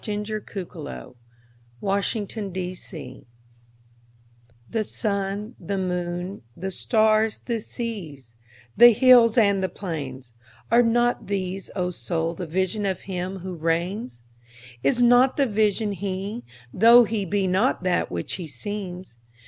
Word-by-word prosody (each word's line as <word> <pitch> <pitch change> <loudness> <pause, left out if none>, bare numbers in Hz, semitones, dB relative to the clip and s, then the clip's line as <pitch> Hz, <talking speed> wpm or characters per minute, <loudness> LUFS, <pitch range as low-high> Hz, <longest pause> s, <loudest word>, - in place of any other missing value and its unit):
The 210 0 -3
Higher 65 - -7 0.7
Pantheism 190 - -3 1.5
THE 225 -1 0
SUN, 205 +2 -2
the 195 +3 -3
moon, 180 0 -3 0.2
the 190 +2 -4
stars, 215 +2 +2
the 235 -2 -1
seas, 165 - -7 0.4
the 240 +1 +9
hills 245 -1 +6
and 200 -4 +4
the 190 - 0
plains—Are 130 - -3
not 240 +1 +1
these, 190 -1 -3
O 180 -2 -1
Soul, 165 -1 -2
the 175 +1 -6
Vision 190 +5 -1
of 190 -2 -2
Him 185 0 -4
who 185 0 -5
reigns? 165 - -2 0.6
Is 140 - +3
not 245 +2 +5
the 280 - +4
Vision 215 -1 +1
He? 200 +3 -4 0.3
tho' 235 +4 +7
He 220 -2 -2
be 195 +1 0
not 190 +3 +1
that 180 -1 +1
which 85 -1 -4
He 170 - -6
seems? 185 - -6
195 Hz, 120 wpm, -24 LUFS, 175-215 Hz, 1.5 s, the